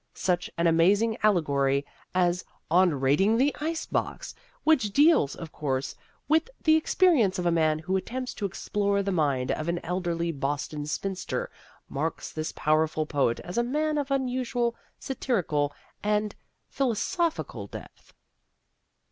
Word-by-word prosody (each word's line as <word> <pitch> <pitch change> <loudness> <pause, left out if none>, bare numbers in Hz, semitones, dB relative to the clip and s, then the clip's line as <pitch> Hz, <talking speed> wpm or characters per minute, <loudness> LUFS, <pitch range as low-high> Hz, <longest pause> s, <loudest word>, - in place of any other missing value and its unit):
Such 180 -1 0
an 170 - +1
amazing 195 +7 +4
allegory 140 -8 +2 0.3
as 180 -1 +2 0.3
"On 175 -4 +4
Raiding 170 +12 +3
the 275 +4 +2
Ice 320 +1 -2
Box," - - -3 0.3
which 295 -10 +3
deals, 290 - +4
of 165 -2 -8
course, 135 -2 -2 0.3
with 320 +7 +2
the 315 -1 +5
experience 310 - +3
of 180 - -2
a 175 - +3
man 155 -2 +2
who 180 +5 -2
attempts 255 +6 -3
to 200 - -2
explore 200 +1 -1
the 195 - -1
mind 140 -7 +1
of 155 - -2
an 170 - 0
elderly 170 -1 -1
Boston 145 +1 -3
spinster, 195 - -3 0.4
marks - - -3
this 155 0 -3
powerful 155 0 +1
poet 140 -6 0
as 180 +6 -3
a - - +3
man 300 +4 0
of 285 -1 -3
unusual 250 -3 0 0.2
satirical 180 - -1 0.3
and 210 0 0 0.3
philosophical 310 - -1
depth. - - -11
190 Hz, 140 wpm, -27 LUFS, 155-250 Hz, 0.4 s, the